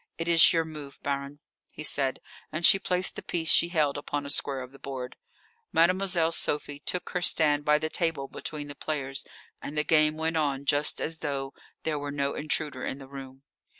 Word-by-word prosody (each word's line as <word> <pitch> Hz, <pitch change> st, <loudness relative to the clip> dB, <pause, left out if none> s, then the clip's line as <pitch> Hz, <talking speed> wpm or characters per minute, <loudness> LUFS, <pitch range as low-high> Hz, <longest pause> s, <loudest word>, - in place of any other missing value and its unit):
"It 165 Hz, -, -3 dB
is 165 Hz, -1 st, +7 dB
your 165 Hz, -1 st, +2 dB
move, 150 Hz, -3 st, -8 dB
Baronne," 140 Hz, +1 st, -3 dB, 0.3 s
he 155 Hz, -, -7 dB
said, 135 Hz, -3 st, 0 dB, 0.3 s
and 160 Hz, +2 st, +1 dB
she 195 Hz, -, +8 dB
placed 180 Hz, -1 st, +1 dB
the -, -, -6 dB
piece 165 Hz, -2 st, -1 dB
she 170 Hz, -, +5 dB
held 150 Hz, -5 st, +1 dB
upon 145 Hz, 0 st, -4 dB
a 140 Hz, -, 0 dB
square 135 Hz, -2 st, 0 dB
of 125 Hz, 0 st, -9 dB
the 135 Hz, -, -15 dB
board. 130 Hz, -2 st, -6 dB, 0.6 s
Mademoiselle 175 Hz, -1 st, +3 dB
Sophie 145 Hz, -2 st, -1 dB
took 180 Hz, +5 st, -2 dB
her 180 Hz, -, -1 dB
stand 150 Hz, -4 st, +2 dB
by 150 Hz, 0 st, +5 dB
the 155 Hz, +1 st, -2 dB
table 155 Hz, -4 st, -1 dB
between 150 Hz, 0 st, -6 dB
the 145 Hz, -, -7 dB
players, 135 Hz, -2 st, -4 dB, 0.3 s
and 150 Hz, -, -6 dB
the 150 Hz, -, +2 dB
game 155 Hz, -1 st, +3 dB
went 160 Hz, +1 st, -1 dB
on 140 Hz, -3 st, 0 dB
just 145 Hz, +1 st, +3 dB
as 160 Hz, +1 st, -3 dB
though 135 Hz, -2 st, -3 dB, 0.3 s
there 155 Hz, -2 st, -1 dB
were 145 Hz, 0 st, -4 dB
no 140 Hz, 0 st, -1 dB
intruder 150 Hz, -3 st, -1 dB
in 135 Hz, -, -3 dB
the 135 Hz, -1 st, -11 dB
room. 135 Hz, -1 st, -10 dB
150 Hz, 200 wpm, -28 LUFS, 140-160 Hz, 0.6 s, she